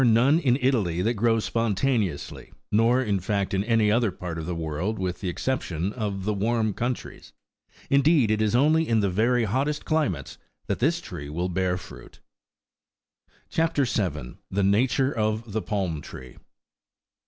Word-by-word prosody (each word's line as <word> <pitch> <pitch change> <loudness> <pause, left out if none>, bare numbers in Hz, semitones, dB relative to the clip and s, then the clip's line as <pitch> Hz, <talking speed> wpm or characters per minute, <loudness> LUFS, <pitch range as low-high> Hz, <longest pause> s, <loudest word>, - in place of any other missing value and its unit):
none 125 +6 +4
in 130 -6 +2
Italy 100 -10 +1
that 115 +4 +1
grow 115 +1 +2
spontaneously, 110 - -1
10 - - -23 0.2
nor, 115 +4 +3
in 100 -5 0
fact, 100 +1 -1
in 95 0 +1
any 115 -2 +3
other 115 0 +2
part 90 -2 -6
of 80 - -6
the 90 - -2
world, 85 +6 -3
with 90 -1 -3
the 95 - -2
exception 95 -4 -2
of 100 -5 -3
the 105 - +1
warm 110 +1 0
coun 120 +4 -1
tries: - - -13 0.5
indeed, 140 -4 +4
it 110 0 +1
is 110 +1 +1
only 155 +5 +3
in 115 -2 +2
the 100 -2 +1
very 115 +5 +2
hottest 135 +8 -1
climates 100 - -1 0.3
that - - -2
this - - +1
tree 70 0 -8
will 85 +4 -2
bear 90 0 0
fruit. - - -12 1.3
CHAP. 165 -1 0
7. 75 - -3
THE 100 +1 0
NATURE 125 +7 +2
OF 110 0 -1
THE 110 +2 -1
PALM 95 -9 -2
TEEE. 65 -1 -11
105 Hz, 165 wpm, -25 LUFS, 95-120 Hz, 1.3 s, none